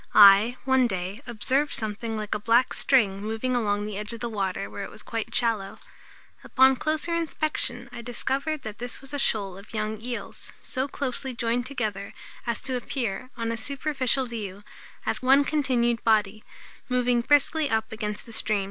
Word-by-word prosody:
I, 205 +4 +8
one 260 -2 +4
day, 190 +2 -4
observed 265 +5 0
something 220 +1 -3
like 215 -1 -3
a - - -1
black 230 +4 +3
string 205 -8 +3
moving 225 +4 -1
along 205 -3 0
the 210 -1 -4
edge 210 +2 -2
of 230 - -7
the 235 0 -3
water 195 -2 -2
where 200 - -6
it - - -6
was 215 - -11
quite 225 -2 -4
shallow. 220 -5 0 0.7
Upon 265 0 +5
closer 310 +4 -1
inspection, 310 -7 -1
I 235 - -7
discovered 275 +5 -2
that 215 -1 -7
this 245 +1 -4
was 270 +1 -9
a 285 - -1
shoal 195 -7 0
of 210 +3 -12
young 215 0 -2
eels, 240 0 -6
so 260 +1 -2
closely 265 -2 -3
joined 240 +1 0
together 215 -7 -3 0.3
as 235 - -2
to 260 - -2
appear, 245 -2 -3
on 230 -1 -1
a 230 - -2
superficial 270 +1 0
view, 210 -4 -6 0.6
on 270 +2 +6
continued 245 -6 +1
body, 215 -1 +2 0.5
moving 250 -1 +2
briskly 290 +3 +3
up 220 -2 0
against 210 -1 -4
the 230 - -9
stream. 215 -1 +1
235 Hz, 175 wpm, -26 LUFS, 215-260 Hz, 0.7 s, I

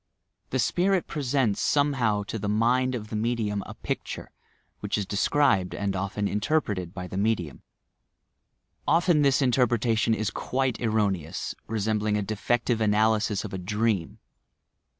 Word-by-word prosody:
The 130 - -1
spirit 180 +9 +2
presents 135 -7 0
somehow 125 -8 +2
to 110 +2 -5
the 100 +1 -2
mind 125 +4 +2
of 105 -3 -6
the 110 - -4
medium 110 -2 -1
a - - -8
picture, - - -5 0.5
which - - -2
is 100 - -1
described 100 -2 +2
and 100 -1 -2
often 100 +2 -2
interpreted 105 - -1
by 90 -1 -6
the 95 - -6
medium. 100 - -1 1.3
Often 165 0 +4
this 140 0 +3
interpretation 120 -3 +2
is 110 -1 -2
quite 130 -1 -1
erroneous, 100 -7 -1
resembling 105 -1 0
a 105 - -1
de 110 +2 -3
fective 120 +2 0
analysis 110 -1 +2
of 100 - -7
a 95 - -3
dream. 105 -1 -1
110 Hz, 140 wpm, -26 LUFS, 100-125 Hz, 1.3 s, Often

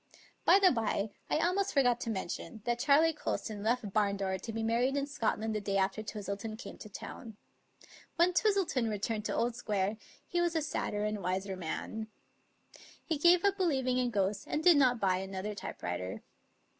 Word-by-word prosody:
By - - +8
the 385 -2 +6
bye, 220 -4 -1 0.2
I - - +2
almost 375 +5 +1
forgot 245 -4 +3
to 235 - -4
mention 205 +1 -5
that 240 0 0
Charley 295 +5 +4
Colston 215 -8 -3
left 230 +1 0
Barndore 200 -2 0
to 230 - -5
be 225 0 -3
married 245 +5 +1
in 280 - 0
Scot 260 -8 -1
land 220 0 -2
the 215 - -2
day 195 -1 -1
after 195 +2 +1
Twistleton 210 0 -5
came 250 - -9
to 215 - -9
town. 220 +2 -9 0.8
When 345 +2 +4
Twistleton 365 - +2
returned 210 +1 -2
to - - -1
Old 235 0 0
Square 205 -3 -1 0.3
he 350 - 0
was 345 -1 +1
a 320 - +2
sad 295 - -2
der 205 0 -1
and 210 0 -1
a - - -8
wiser 190 +2 -2
man. 190 +5 -4 1.0
He 320 -4 -1
gave 345 +4 +5
up 400 -1 +3
believing 265 -9 +1
in 250 -1 +1
ghosts, 200 -2 -1
and 305 - -2
did 345 -3 +7
not 250 -4 +4
buy 185 -3 +2
another 190 +2 -4
typewriter. 90 - -5
225 Hz, 190 wpm, -32 LUFS, 200-285 Hz, 1.0 s, By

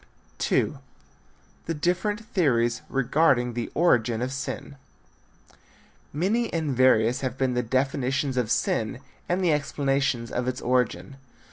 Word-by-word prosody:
II. 145 - +1 0.9
THE 165 - -1
DIFFERENT 195 +8 -1
THEORIES 120 - +2
REGARDING 135 -2 +2
THE 120 -1 -3
ORIGIN 120 -8 +2
OF 130 +1 -3
SIN. 140 +1 -5 1.3
Many 210 +10 0
and 155 -5 -1
various 125 -1 +4
have 130 -1 -3
been 130 -2 0
the 125 - +1
definitions 135 +2 0
of 125 -4 0
sin 115 +1 0 0.3
and 180 +2 +1
the 170 -3 +3
explanations 135 -4 0
of 125 0 -2
its 130 0 -2
origin. 125 -3 -1
130 Hz, 125 wpm, -26 LUFS, 125-150 Hz, 1.3 s, various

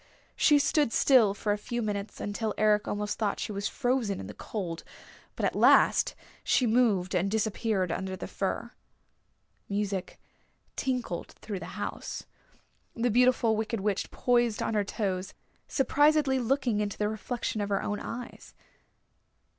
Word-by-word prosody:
She 295 - +5
stood 285 -2 +2
still 230 -6 +5
for 205 +1 -1
a 205 - 0
few 240 +3 -3
minutes, 205 -1 -4
until 210 +1 -3
Eric 210 -1 +3
almost 205 0 -2
thought 210 -3 0
she - - -3
was 200 0 -2
frozen 245 -6 0
in - - -6
the 105 - -8
cold. 175 -6 -5 0.5
But - - -1
at - - +1
last - - +5 0.3
she 255 - +3
moved 220 -6 +2
and 180 +2 +1
disappeared 215 -3 0
under 190 +2 -3
the - - -6
fir. 215 +4 -3 1.0
Music 200 -2 -2 0.6
tinkled 250 -10 -3
through 205 -4 -6
the - - -8
house. - - -5 0.7
The 240 0 +1
Beautiful 240 -1 +4
Wicked 220 0 -2
Witch 200 -1 -1
poised 240 -3 +1
on - - -1
her 210 -1 +2
toes, 190 -2 -3 0.3
surprisedly 290 0 +3
looking 250 -3 +1
into 205 -1 -2
the 210 - 0
reflection 220 +1 -3
of 205 - -2
her 200 - 0
own 210 - -2
eyes. 245 +1 -8
215 Hz, 150 wpm, -29 LUFS, 200-245 Hz, 1.0 s, She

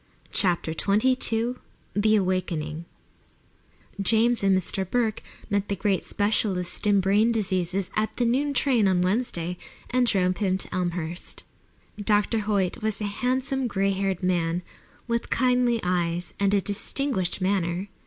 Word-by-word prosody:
CHAPTER 175 -4 +1
XXII 225 +4 +1 0.4
THE 215 +1 +3
AWAKENING 170 -5 -1 1.2
James 230 +4 +3
and 195 -1 +3
Mr. 190 +1 -1
Burke 230 -2 0 0.3
met 205 -1 0
the 200 - 0
great 195 0 0
specialist 205 -3 0
in 200 -1 +4
brain 205 +5 +3
diseases 190 -3 -1
at 215 0 -1
the 245 - +1
noon 280 +4 +1
train 245 -7 +3
on 185 -2 +2
Wednesday 180 -4 -1 0.3
and 250 0 +2
drove 185 -4 +2
him 190 -3 +1
to - - -5
Elmhurst. 175 -1 -3 0.6
Dr. 210 +2 +2
Hoyt 200 -3 -1
was 215 -1 +1
a - - -4
handsome, 255 +5 -1
gray 195 -2 0
haired 195 -1 -2
man, 175 -1 0 0.4
with 235 0 -1
kindly 250 -2 +2
eyes 175 -1 -1
and 200 0 +3
a 200 - +2
distinguished 205 -1 -1
manner. 185 -1 0
200 Hz, 135 wpm, -25 LUFS, 180-225 Hz, 1.2 s, in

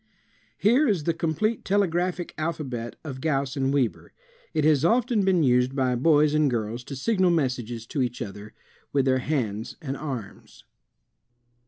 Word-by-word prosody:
Here 250 +9 +4
is 195 -9 +1
the 170 - +1
complete 170 +7 -1
telegraphic 180 -2 0
alphabet 140 -7 -4
of 135 -4 -7
Gauss 140 -3 0
and 135 -1 0
Weber. 135 -5 -1 0.4
It 155 -2 0
has 150 -2 +4
often 225 +2 +2
been 185 -4 +3
used 125 0 +3
by 130 -2 +1
boys 150 +3 +3
and 155 -2 +3
girls, 115 0 -3
to 140 - -6
signal 185 - +2
messages 125 -8 -1
to 135 +4 -2
each 125 -1 -2
other, 105 +1 -8 0.4
with 140 -2 +2
their 130 -1 +3
hands 115 -7 -2
and 135 -2 -4
arms. 130 -8 -7
145 Hz, 155 wpm, -25 LUFS, 125-170 Hz, 0.4 s, Here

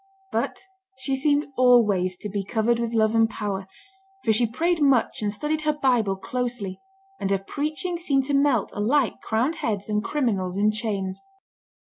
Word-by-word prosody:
But - - -2 0.4
she 270 +1 -1
seemed 290 +2 +2
always 210 -8 +4
to 210 - -3
be 200 0 -3
"covered 225 +4 +1
with 235 0 -2
love 220 0 +3
and 225 0 +4
power," 200 -3 -4 0.6
for 220 - +3
she 235 +2 +2
prayed 330 +8 0
much 275 -6 +3
and 205 -1 0
studied 300 +9 -2
her 305 0 +1
Bible 240 -8 +2
closely, 235 -2 -4 0.4
and 195 - -2
her 195 - +3
preaching 305 - -3
seemed 275 -6 +1
to 285 - -2
melt 275 -5 +2
alike 240 +5 +1
crowned 245 +9 0
heads 205 -2 -2
and 210 0 0
criminals 200 -11 -1
in 210 +1 +3
chains. 205 -4 -3
230 Hz, 165 wpm, -24 LUFS, 205-275 Hz, 0.6 s, always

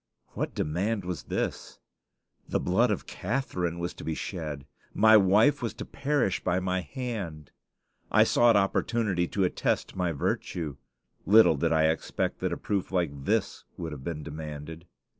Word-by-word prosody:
What - - -4
demand 95 +6 -1
was 90 -1 -3
this? - - -3 0.7
The - - +1
blood 115 +8 +2
of 105 - -2
Catharine 90 -6 -2
was 85 +1 -3
to - - -10
be 80 - -2
shed! 75 -7 -5 0.3
My 110 +1 +7
wife 105 +8 +5
was 115 - -3
to - - -6
perish 140 -9 0
by 90 - +1
my 95 0 -1
hand! 100 - -5 0.6
I - - +6
sought 120 -1 +4
opportunity 100 -2 +1
to 100 - -1
attest 90 - -1
my 90 -2 0
virtue. 75 0 -2 0.5
Little 110 -4 +7
did 80 +3 0
I 80 -1 +3
expect 80 - -2
that - - -1
a - - -2
proof 100 -3 -2
like 75 -7 -1
this - - 0
would 85 -2 -5
have 70 -3 -8
been 75 -1 -4
demanded. 80 +2 -7
90 Hz, 160 wpm, -28 LUFS, 80-105 Hz, 0.7 s, My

